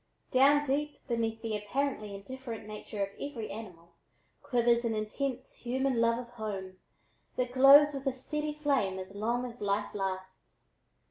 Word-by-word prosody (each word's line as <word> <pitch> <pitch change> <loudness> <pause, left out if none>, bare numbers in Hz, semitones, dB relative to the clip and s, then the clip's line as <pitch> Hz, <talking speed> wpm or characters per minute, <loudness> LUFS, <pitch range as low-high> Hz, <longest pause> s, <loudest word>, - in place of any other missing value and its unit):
Down 280 +3 +5
deep 290 +2 -2
beneath 225 -2 -1
the 225 -2 -1
apparently 210 0 -2
indifferent 230 +2 -7
nature 210 -1 -4
of 195 - -2
every 240 -8 -4
animal 180 -6 -9 0.5
quivers 240 -1 +2
an 230 -2 0
intense 250 +5 -3
human 255 0 0
love 230 0 +3
of 240 -1 -6
home 200 -5 -5 0.6
that 250 -1 -1
glows 280 +3 +8
with 275 0 -4
a 270 - +2
steady 300 +3 -3
flame 275 -11 +1
as 190 +1 -7
long 235 +4 -1
as 245 0 -9
life 205 0 0
lasts. 190 -1 -5
235 Hz, 150 wpm, -31 LUFS, 210-265 Hz, 0.6 s, glows